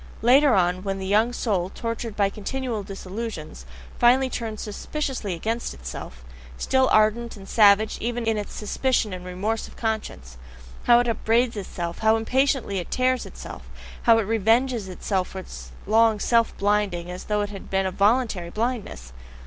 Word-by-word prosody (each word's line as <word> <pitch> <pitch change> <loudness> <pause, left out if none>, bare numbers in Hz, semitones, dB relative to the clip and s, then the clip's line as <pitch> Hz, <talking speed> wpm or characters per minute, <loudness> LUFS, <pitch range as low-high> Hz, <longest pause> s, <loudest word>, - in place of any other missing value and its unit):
Later 265 +2 +6
on, 180 -1 +2
when 195 0 -3
the 190 - -5
young 215 +5 +3
soul, 195 -7 -1
tortured 230 0 -5
by 200 -2 +2
continual 235 +2 -3
disillusions, 195 - -7 0.3
finally 255 +2 +4
turns 220 -3 -4
suspiciously 225 - -4
against 225 +7 -3
itself 60 0 -8 0.3
still 260 0 +2
ardent 215 +2 +2
and 195 -1 -12
savage 210 0 +4
even 240 0 -2
in 225 0 +1
its 210 -1 -4
suspicion 220 -1 0
and 180 -1 -6
remorse 195 +5 -3
of - - -15
conscience: 210 - -4 0.5
how 240 - +7
it 245 - -2
upbraids 230 +1 +1
itself, 175 -4 -5
how 220 0 +4
impatiently 250 -2 +1
it 175 - -7
tears 255 0 +1
itself, - - -10 0.3
how 230 -1 +5
it 225 - +2
revenges 225 +1 +1
itself 185 0 -2
for - - -10
its 190 - -9
long 220 +1 +4
self 230 +2 +2
blinding, 200 -4 0
as 180 - -7
though 210 -1 0
it 205 0 -3
had 195 - -9
been 195 0 +1
a 190 - -1
voluntary 200 -3 +1
blindness! 210 - -4
215 Hz, 165 wpm, -24 LUFS, 190-235 Hz, 0.5 s, how